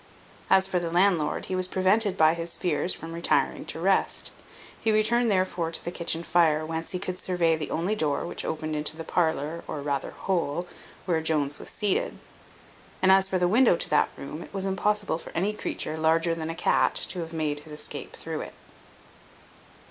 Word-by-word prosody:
As 190 0 +5
for 190 -2 0
the 170 -1 -3
landlord, 175 -3 +2
he 185 - -3
was 185 0 +2
prevented 190 +2 +3
by 155 -1 +5
his 170 0 -3
fears 175 +1 0
from 165 +1 -5
retiring 170 +1 +1
to - - -4
rest. - - +1 0.5
He 225 - +1
returned 230 +3 +3
therefore 185 -4 0
to - - -1
the 175 - -2
kitchen 170 -1 0
fire, 160 -3 +3
whence 165 +1 -4
he 180 - -2
could 180 0 -5
survey 170 -3 +1
the 155 -2 -5
only 180 +6 -1
door 155 -8 0
which - - -4
opened 155 -1 -3
into 150 +1 0
the 165 - -5
parlour, 160 -1 -1
or 145 -2 -5
rather 140 -2 -1
hole, 175 -3 -2 0.4
where 165 -3 +1
Jones 150 -3 0
was - - -8
seated; 205 -3 -1 0.8
and 190 - +4
as 190 0 +5
for 190 - 0
the 180 -1 +2
window 225 +1 +5
to - - -2
that 150 - +4
room, 150 +4 -7
it - - -11
was 195 -1 -2
impossible 200 -2 0
for - - -10
any 195 +6 0
creature 185 -6 -3
larger 165 +1 +2
than 160 -1 -4
a 165 - -4
cat 175 - +2
to 185 - -1
have 165 -1 -5
made 155 -3 -2
his 150 +1 -13
escape 150 - -4
through - - -5
it. - - -8
170 Hz, 195 wpm, -26 LUFS, 160-190 Hz, 0.8 s, As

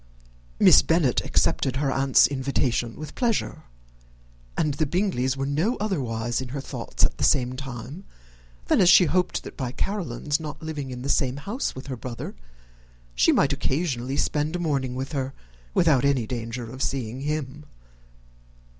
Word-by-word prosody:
Miss - - +8
Bennet - - +2
accepted 130 -1 +1
her 135 0 0
aunt's 135 0 +5
invitation 130 -4 -1
with 155 0 -8
pleasure; 235 -4 -1 0.9
and 150 -2 +1
the 150 +1 0
Bingleys 140 -7 0
were 135 - -1
no 160 - 0
otherwise 120 - -2
in 130 - -5
her - - -2
thoughts - - -4
at - - -3
the - - -1
same 125 -3 +3
time 135 - -7 0.6
than - - +3
as 180 - +6
she 180 - +8
hoped, 180 +1 0
by 125 -4 -3
Caroline's 145 - -2
not 155 -2 -6
living 150 -4 -4
in 125 -1 -6
the - - -4
same 135 -1 +1
house 205 - -3
with 130 - -8
her 135 -2 -5
brother, 120 0 -6 0.8
she - - +4
might 140 0 +3
occasionally 135 -2 -1
spend 150 +3 0
a - - -1
morning 135 -6 -1
with 130 +3 -4
her, 135 -2 -3 0.4
without 150 -7 +4
any 140 -4 +2
danger 115 0 -5
of 130 - -8
seeing 130 -3 -2
him. 150 0 -4
135 Hz, 160 wpm, -25 LUFS, 125-155 Hz, 0.9 s, Miss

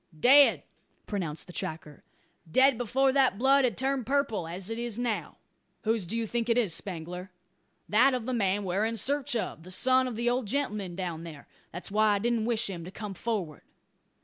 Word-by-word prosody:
"Dead!" 275 - +6 0.4
pronounced 165 -7 -4
the 180 - -12
tracker. 155 -2 -6 0.5
"Dead 265 - +5
before 255 +3 +1
that 260 -6 +3
blood 270 +3 +4
had 235 -7 0
turned 270 0 0
purple 265 - 0
as 180 +5 -5
it 225 - -3
is 235 -2 -4
now." 240 -3 -3 0.5
"Whose 220 -5 0
do 225 +6 -2
you 230 - -1
think 235 +1 -2
it 230 - +3
is, 215 -9 +2
Spangler?" 180 +1 -4 0.6
"That 255 +5 +4
of 245 -3 -4
the 255 - -2
man 205 -3 +1
we're 190 +2 0
in 225 +1 -1
search 280 +4 0
of 215 -7 -3
the 175 - -12
son 255 +7 +3
of 245 - -5
the 235 +2 -2
old 245 -1 0
gentleman 210 -8 -2
down 175 -3 -4
there. 155 -4 -10 0.2
That's 175 +3 -6
why 215 0 +3
I - - +1
didn't 230 +1 0
wish 235 -2 0
him 180 -4 -5
to 175 - -8
come 205 +1 -7
forward." 195 -7 -3
220 Hz, 200 wpm, -28 LUFS, 185-250 Hz, 0.6 s, Dead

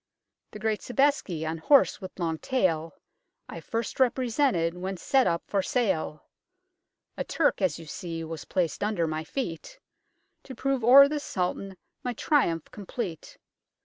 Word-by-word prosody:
The - - -9
great 215 0 -1
Sobeiski, 245 - 0
on 160 +1 -3
horse 275 - +4
with 185 -1 -9
long 165 -3 -2
tail 165 -10 0 0.5
I - - -7
first 230 +1 -4
represented 250 - +2
when 185 +2 -5
set 265 +7 +2
up 170 -1 0
for 200 - 0
sale; 190 -9 -1 0.9
A - - -1
Turk, 310 -9 +1
as 180 -6 +1
you 165 - -10
see, 165 +1 -6
was 160 -1 -7
placed 180 -1 -1
under 205 -5 0
my 155 0 -3
feet, 255 - -5 0.7
To 260 - -9
prove 270 0 -1
o'er 270 +4 +9
the 300 +1 -2
Sultan 190 -4 -3 0.3
my 245 - -2
triumph 215 - +1
complete. 200 -4 -6
195 Hz, 145 wpm, -27 LUFS, 165-255 Hz, 0.9 s, o'er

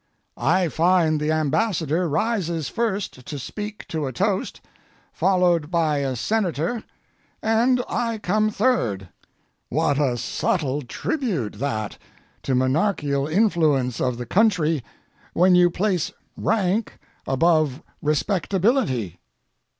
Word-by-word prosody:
I 180 +2 +2
find 165 -1 +2
the 150 +1 0
Ambassador 160 +1 0
rises 170 - -1
first 205 - -2
to 145 - -6
speak 210 - -7
to 155 -3 -2
a - - -3
toast, 115 - -1 0.5
followed 175 -3 +2
by 165 -4 +1
a 135 -2 -1
Senator, 205 - -1 0.6
and 240 +3 +3
I 230 -1 -1
come 215 +1 +1
third. 120 - 0 0.6
What 145 0 +1
a 130 -5 +1
subtle 140 +3 -1
tribute 165 - -3
that 110 -6 -3 0.4
to 130 - -1
monarchial 140 +1 +1
influence 155 - +2
of 125 -2 0
the 120 - -5
country 165 - +2 0.5
when 180 +2 +4
you 180 0 +6
place 180 -2 0 0.2
rank 205 +1 0 0.3
above 155 -1 +2 0.2
respectability! 170 - 0
165 Hz, 110 wpm, -23 LUFS, 140-205 Hz, 0.6 s, you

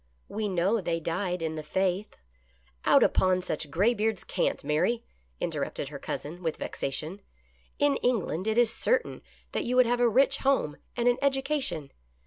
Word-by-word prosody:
We 215 0 -2
know 195 +4 +1
they 165 -2 -1
died 175 +1 -2
in 160 -1 -1
the 155 - -4
faith." 190 +5 -1 0.4
" 60 0 -28
Out - - +6
upon 185 -1 +3
such 155 -4 -4
graybeard's 215 +4 +1
cant, - - -1
Mary! 225 +11 +1 0.2
" 60 0 -39
interrupted - - -3
her - - -7
cousin 165 +5 -5
with 165 -3 -2
vexation. 155 +8 -4 0.3
" - - -35
In 290 -1 +3
England 210 -6 0
it 220 +1 +1
is 240 -2 +4
certain - - 0 0.3
that - - -1
you 245 +1 -1
would 255 0 +6
have 240 +1 +1
a 240 -1 +5
rich 275 +4 +3
home 265 - +1 0.2
and 240 0 +1
an 245 +1 +3
education. 270 - 0
195 Hz, 175 wpm, -28 LUFS, 160-240 Hz, 0.4 s, Out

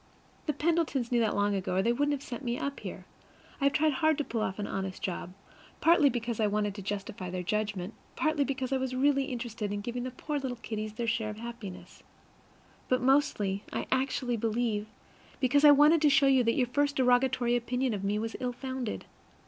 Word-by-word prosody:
The 300 - +1
Pendletons 300 -5 0
knew 240 - +3
that 225 -2 +1
long 205 0 +2
ago, 190 -2 -2
or 190 - +2
they 235 - +3
wouldn't 290 +4 +1
have 275 - -13
sent 245 +2 -6
me 240 -1 -1
up 280 0 -3
here. - - -7 0.5
I 280 - 0
have 280 - +4
tried 310 0 +3
hard 315 +3 +2
to 295 - 0
pull 230 -5 -3
off 190 -2 -2
an 205 - -3
honest 190 -1 -4
job, 180 -1 -4 0.4
partly 325 -3 +5
because 235 -2 -3
I 215 - +3
wanted 205 0 0
to 200 - -7
justify 195 -2 -5
their 180 0 -3
judgment, 205 0 -2 0.2
partly 310 -2 +1
because 270 -1 -2
I - - +3
was 260 -1 -2
really 275 +1 +3
interested 230 -5 -4
in 205 0 -2
giving 240 +3 -4
the 255 - -3
poor 290 +4 -4
little 260 -3 -4
kiddies 215 -2 -5
their 235 +2 -3
share 225 -1 0
of 210 - -7
happiness, 230 -5 -8 0.9
but 255 - +3
mostly, 250 -8 +2
I - - -2
actually 260 -2 0
believe, 220 -1 -1 0.5
because 285 +2 +3
I 300 - +10
wanted 295 +3 +6
to 300 - +5
show 280 0 +5
you 265 -2 +5
that 230 - +2
your 255 - +3
first 285 +4 0
derogatory 250 -1 +3
opinion 250 +1 0
of 200 -2 -4
me 200 +1 0
was 225 +1 -3
ill 250 -1 -2
founded. 260 -2 -4
245 Hz, 215 wpm, -30 LUFS, 210-275 Hz, 0.9 s, I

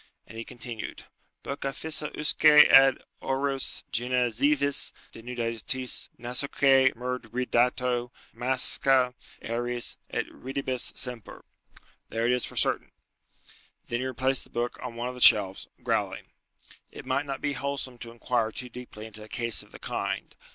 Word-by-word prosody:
And - - -13
he 115 - -5
continued, 120 -2 -8 0.4
"Bucca 140 0 -4
fissa 155 0 -2
usque 150 +1 0 0.3
ad 135 -1 +7 0.2
aures, 135 0 -1
genezivis 125 +4 +1 0.2
denudatis, 120 +2 -2
nasoque 130 +2 +3
murdridato, 125 0 -1 0.2
masca 130 +1 +3 0.3
eris, 120 +1 -3
et - - -2
ridebis 130 -1 -3
semper." 125 -3 -4 0.6
"There 115 +1 -1
it 120 - +3
is 125 -1 +2
for - - -11
certain." - - +2 1.0
Then 120 - -1
he 130 - -2
replaced 130 +1 +1
the - - -18
book 120 +1 -3
on 125 -2 -6
one 120 +1 -3
of - - -6
the 125 - -10
shelves, 100 -5 +5 0.2
growling. - - -1 0.6
"It - - -11
might 145 +1 -1
not 135 0 -4
be 145 - -1
wholesome 135 -2 -3
to 115 - -8
inquire 115 -1 -1
too 125 +3 -7
deeply 120 -3 -10
into 110 -1 -11
a 105 - -11
case 115 0 +1
of - - -17
the - - -11
kind. - - -4
125 Hz, 140 wpm, -27 LUFS, 120-135 Hz, 1.0 s, ad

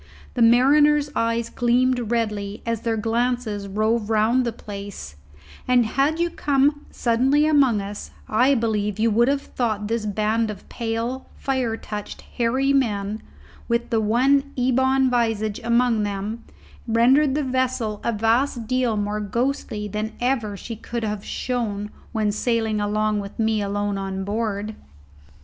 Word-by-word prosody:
The 245 - -2
mariners' 290 +5 +5
eyes 230 0 0
gleamed 245 -1 +1
redly 210 -3 -2
as 230 -2 -2
their 230 -1 -1
glances 230 -2 -1
rove 215 +2 0
round 225 +4 +3
the - - 0
place, 200 - -8 0.5
and, 250 -2 +4
had 275 +8 +1
you 345 0 +1
come 290 0 +1
suddenly 260 +5 +2
among 275 -8 +3
us, 205 +1 -7 0.2
I 250 +6 +3
believe 210 -3 -1
you 225 +1 +2
would 235 +3 +3
have 280 0 +1
thought 215 -4 -2
this 225 -1 -1
band 215 +2 0
of 205 -2 -8
pale, 230 +3 -3
fire 255 -4 -1
touched, 210 -2 -7
hairy 260 +4 0
men, 215 -5 0 0.5
with 235 0 -1
the 225 -1 +2
one 270 +6 +2
ebon 260 +1 +2
visage 225 -3 0
among 235 -1 +2
them, 205 +3 -4 0.4
rendered 260 +5 +4
the 300 - 0
vessel 255 -5 -1
a 235 - +1
vast 230 +3 +1
deal 250 -2 0
more 205 +1 -1
ghostly 215 0 -2
than 215 +2 -4
ever 235 -5 -1
she 230 - -7
could 235 +2 -5
have 210 -2 -3
shown 210 -5 -3 0.2
when 215 -3 0
sailing 220 -1 0
along 215 0 0
with 200 -1 -7
me 220 -1 +1
alone 205 0 -2
on 190 0 -4
board. 210 0 -2
230 Hz, 145 wpm, -23 LUFS, 210-255 Hz, 0.5 s, mariners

